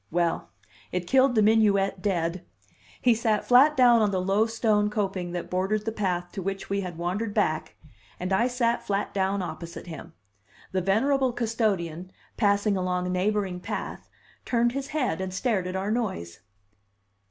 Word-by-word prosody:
Well, 170 Hz, 0 st, 0 dB, 0.4 s
it 180 Hz, -1 st, -2 dB
killed 260 Hz, +4 st, +4 dB
the 215 Hz, -, +4 dB
minuet 205 Hz, -3 st, +3 dB
dead; 175 Hz, -2 st, -1 dB, 0.6 s
he 245 Hz, -, +4 dB
sat 220 Hz, -2 st, 0 dB
flat 275 Hz, +5 st, +6 dB
down 240 Hz, -3 st, +6 dB
on 210 Hz, -, +3 dB
the 190 Hz, -2 st, -1 dB
low 195 Hz, +4 st, +2 dB
stone 215 Hz, -2 st, +1 dB
coping 195 Hz, -4 st, -2 dB
that 175 Hz, -, -4 dB
bordered 195 Hz, +4 st, 0 dB
the 225 Hz, -, -1 dB
path 180 Hz, -5 st, -2 dB
to 195 Hz, -, -5 dB
which 195 Hz, +1 st, -4 dB
we 200 Hz, 0 st, +1 dB
had 180 Hz, -3 st, -6 dB
wandered 195 Hz, +5 st, -2 dB
back 155 Hz, -7 st, 0 dB, 0.4 s
and 185 Hz, +2 st, -2 dB
I 230 Hz, +6 st, +3 dB
sat 240 Hz, -1 st, 0 dB
flat 200 Hz, 0 st, -2 dB
down 195 Hz, 0 st, 0 dB
opposite 170 Hz, 0 st, -7 dB
him. 165 Hz, -1 st, -9 dB, 0.6 s
The 185 Hz, -, 0 dB
venerable 255 Hz, +8 st, +2 dB
custodian, 200 Hz, -7 st, -1 dB, 0.2 s
passing 205 Hz, -1 st, +2 dB
along 180 Hz, -1 st, -1 dB
a -, -, -2 dB
neighboring 190 Hz, 0 st, 0 dB
path, -, -, -6 dB, 0.3 s
turned 240 Hz, -1 st, +1 dB
his 275 Hz, +2 st, -4 dB
head 255 Hz, -, -1 dB
and 190 Hz, 0 st, -3 dB
stared 190 Hz, -1 st, -1 dB
at 185 Hz, -, -4 dB
our 195 Hz, +2 st, -1 dB
noise. 185 Hz, -, -3 dB
200 Hz, 165 wpm, -26 LUFS, 180-225 Hz, 0.6 s, flat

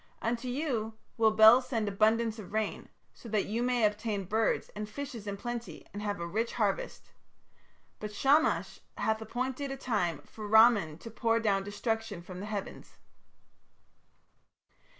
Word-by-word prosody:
Unto 235 Hz, +2 st, -2 dB
you 245 Hz, -5 st, -2 dB, 0.2 s
will 225 Hz, -1 st, +4 dB
Bel 220 Hz, +3 st, +8 dB
send 235 Hz, -4 st, -2 dB
abundance 220 Hz, +2 st, +2 dB
of 200 Hz, -1 st, -10 dB
rain, 220 Hz, 0 st, -2 dB, 0.2 s
so 235 Hz, -, -12 dB
that 215 Hz, -2 st, +1 dB
you 225 Hz, +3 st, -2 dB
may 245 Hz, -2 st, +2 dB
obtain 210 Hz, -1 st, -1 dB
birds 220 Hz, +4 st, 0 dB
and 210 Hz, 0 st, -6 dB
fishes 245 Hz, -3 st, -7 dB
in 200 Hz, 0 st, -3 dB
plenty 240 Hz, +1 st, -6 dB
and 205 Hz, -, -5 dB
have 205 Hz, -1 st, -2 dB
a 170 Hz, -, -3 dB
rich 220 Hz, +7 st, -2 dB
harvest. 205 Hz, -4 st, -2 dB, 0.9 s
But 210 Hz, 0 st, -5 dB
Shamash 280 Hz, +9 st, +2 dB, 0.2 s
hath 220 Hz, 0 st, 0 dB
appointed 255 Hz, +5 st, -3 dB
a 270 Hz, -, -4 dB
time 180 Hz, -, -1 dB
for 215 Hz, -2 st, -9 dB
Ramman 215 Hz, -8 st, +5 dB
to 230 Hz, -, -8 dB
pour 230 Hz, 0 st, +1 dB
down 200 Hz, -3 st, +1 dB
destruction 205 Hz, -2 st, -3 dB
from 180 Hz, 0 st, -9 dB
the 205 Hz, -, -6 dB
heavens. 205 Hz, -2 st, -6 dB
220 Hz, 150 wpm, -30 LUFS, 205-235 Hz, 0.9 s, Bel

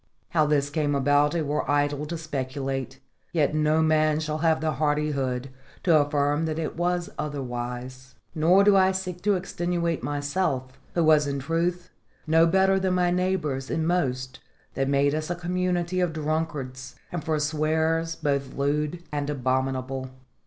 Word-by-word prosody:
How 155 Hz, -3 st, +2 dB
this 145 Hz, -1 st, +1 dB
came 150 Hz, -2 st, 0 dB
about 145 Hz, +2 st, +3 dB
it 160 Hz, -2 st, 0 dB
were 150 Hz, +1 st, -1 dB
idle 145 Hz, 0 st, +1 dB
to 170 Hz, +2 st, -4 dB
speculate; 135 Hz, -3 st, -4 dB, 0.3 s
yet 155 Hz, -3 st, +2 dB
no 155 Hz, +1 st, +2 dB
man 155 Hz, -1 st, +3 dB
shall 155 Hz, 0 st, -3 dB
have 160 Hz, -1 st, +2 dB
the 155 Hz, 0 st, 0 dB
hardihood 140 Hz, -3 st, -1 dB, 0.3 s
to 170 Hz, -3 st, +4 dB
affirm 145 Hz, +1 st, +2 dB
that 155 Hz, -1 st, -2 dB
it 160 Hz, -2 st, -3 dB
was 175 Hz, 0 st, -1 dB
otherwise. 130 Hz, -2 st, -5 dB, 0.2 s
Nor 175 Hz, +5 st, +4 dB
do 205 Hz, 0 st, +5 dB
I 190 Hz, 0 st, +4 dB
seek 185 Hz, -2 st, -4 dB
to 205 Hz, +1 st, +2 dB
extenuate 175 Hz, -2 st, -2 dB
myself, 145 Hz, -1 st, -1 dB, 0.2 s
who 170 Hz, -, +3 dB
was 155 Hz, -2 st, +5 dB
in 140 Hz, 0 st, -2 dB
truth 170 Hz, +5 st, -1 dB, 0.3 s
no 165 Hz, +1 st, +5 dB
better 190 Hz, +2 st, +3 dB
than 185 Hz, -1 st, +1 dB
my 180 Hz, -1 st, +2 dB
neighbours 175 Hz, -7 st, -1 dB
in 160 Hz, 0 st, -1 dB
most 130 Hz, -7 st, -1 dB, 0.3 s
that 135 Hz, 0 st, -1 dB
made 140 Hz, +1 st, +3 dB
us 155 Hz, +1 st, -2 dB
a 175 Hz, -, -1 dB
community 180 Hz, 0 st, -1 dB
of 175 Hz, -3 st, +1 dB
drunkards 150 Hz, -5 st, -3 dB, 0.2 s
and 175 Hz, -3 st, -4 dB
forswearers 160 Hz, +1 st, 0 dB
both 140 Hz, -4 st, -2 dB
lewd 150 Hz, +4 st, -1 dB
and 145 Hz, -1 st, -2 dB
abominable. 130 Hz, -1 st, -1 dB
155 Hz, 155 wpm, -26 LUFS, 140-170 Hz, 0.3 s, do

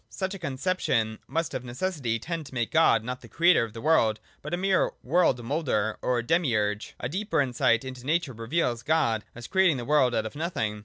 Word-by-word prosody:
Such 190 Hz, 0 st, -3 dB
a 195 Hz, -, -7 dB
conception 130 Hz, -8 st, -1 dB
must 165 Hz, 0 st, -2 dB
of 125 Hz, -, -4 dB
necessity 125 Hz, -2 st, -2 dB
tend 165 Hz, +4 st, -5 dB
to 130 Hz, -, -12 dB
make 120 Hz, -2 st, -1 dB
God 135 Hz, -9 st, +4 dB
not 125 Hz, +2 st, -5 dB
the 120 Hz, -, -12 dB
Creator 165 Hz, -, +4 dB
of 110 Hz, -2 st, -6 dB
the 115 Hz, -, -8 dB
world, 115 Hz, -9 st, +3 dB, 0.2 s
but 150 Hz, -, -7 dB
a 175 Hz, -, 0 dB
mere 190 Hz, +1 st, +1 dB
world 135 Hz, -4 st, +2 dB
moulder 115 Hz, -6 st, -1 dB
or 125 Hz, -2 st, 0 dB
demiurge. 115 Hz, -, 0 dB
A -, -, -2 dB
deeper 200 Hz, -, -1 dB
insight 125 Hz, -3 st, +2 dB
into 130 Hz, -2 st, -8 dB
nature 155 Hz, 0 st, 0 dB
reveals 120 Hz, +1 st, -1 dB
God 120 Hz, -7 st, +1 dB
as 120 Hz, 0 st, -9 dB
creating 190 Hz, -4 st, +3 dB
the 120 Hz, -, -5 dB
world 135 Hz, -4 st, +3 dB
out 110 Hz, -, 0 dB
of 110 Hz, -, -6 dB
nothing. 115 Hz, -10 st, -2 dB
130 Hz, 205 wpm, -27 LUFS, 115-165 Hz, 0.2 s, God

